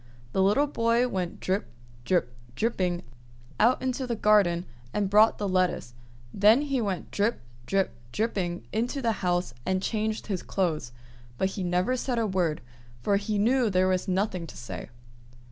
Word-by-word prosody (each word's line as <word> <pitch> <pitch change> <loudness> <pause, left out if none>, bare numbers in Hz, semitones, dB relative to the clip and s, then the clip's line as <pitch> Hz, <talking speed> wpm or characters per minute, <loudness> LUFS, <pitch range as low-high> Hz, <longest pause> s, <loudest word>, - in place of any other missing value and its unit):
The 190 - +1
little 210 +10 +4
boy 235 -3 +2
went 185 -6 -3
drip, 190 +2 -1 0.4
drip, 170 -8 +1 0.2
dripping 185 - 0 0.6
out 240 +4 +4
into 260 0 -1
the 235 - -1
garden 200 -5 +3 0.3
and 200 -2 0
brought 215 +2 +6
the 205 - -2
lettuce; 185 -10 0 0.4
then 215 +6 +5
he 275 -4 0
went 195 -5 -3
drip, 210 +3 +1 0.3
drip, 195 -1 +1 0.2
dripping 180 - -2
into 245 +5 -1
the 230 - +3
house 175 -7 0
and 190 +5 0
changed 215 +2 -2
his 195 -4 -2
clothes; 160 -10 -1 0.5
but 190 - +1
he 195 - -5
said 180 - -1
never 180 +8 +1 0.2
a 225 - +1
word, 180 -6 0 0.4
for 200 - +3
he 205 +1 -2
knew 240 +3 +3
there 185 -1 +3
was 185 -1 0
nothing 185 -2 -1
to - - -11
say. 120 - -7
195 Hz, 160 wpm, -27 LUFS, 180-225 Hz, 0.6 s, brought